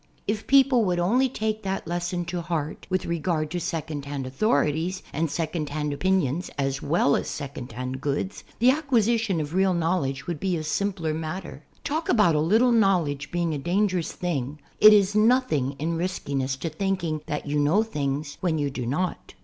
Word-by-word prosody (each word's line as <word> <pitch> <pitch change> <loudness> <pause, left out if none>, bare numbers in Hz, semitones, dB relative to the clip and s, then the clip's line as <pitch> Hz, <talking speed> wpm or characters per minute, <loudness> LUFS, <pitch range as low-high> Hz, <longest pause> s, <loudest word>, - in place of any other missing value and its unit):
If 210 +1 -2
people 270 -3 +5
would 180 -2 +1
only 240 +10 +2
take 220 -2 -2
that 195 -1 -3
lesson 175 0 -2
to 175 0 -3
heart 160 -3 -4
with 185 -1 0
regard 160 -2 -1
to 175 - -2
second 160 -4 -4
hand 140 -2 -4
authorities 165 - 0
and 160 +2 0
second 155 -1 -2
hand 150 0 -2
opinions 180 -1 0
as 135 -1 -1
well 145 -1 +2
as - - -2
second 140 -4 -6
hand 130 +3 -5
goods, 145 +7 -2
the 245 +3 +5
acquisition 230 - +1
of 150 0 -4
real 190 0 +3
knowledge 165 -6 -1
would 170 -4 -4
be 185 -1 0
a 155 - -4
simpler 170 0 -1
matter. 160 -1 -6 0.2
Talk 315 +3 -2
about 210 -8 +4
a 150 - +2
little 220 +10 +4
knowledge 175 -10 +2
being 170 -2 -1
a 145 - -3
dangerous 185 +2 0
thing, 150 -5 -3 0.2
it 215 - +10
is 205 -1 +4
nothing 215 - +2
in 165 +3 -2
riskiness 140 -7 -2
to 165 - -1
thinking 170 -2 -2
that 150 - -3
you 145 0 0
know 160 +9 +3
things 145 -7 -3
when 170 -4 +1
you 145 -2 -1
do 125 -3 -4
not. 175 +8 -3
170 Hz, 180 wpm, -25 LUFS, 145-195 Hz, 0.2 s, it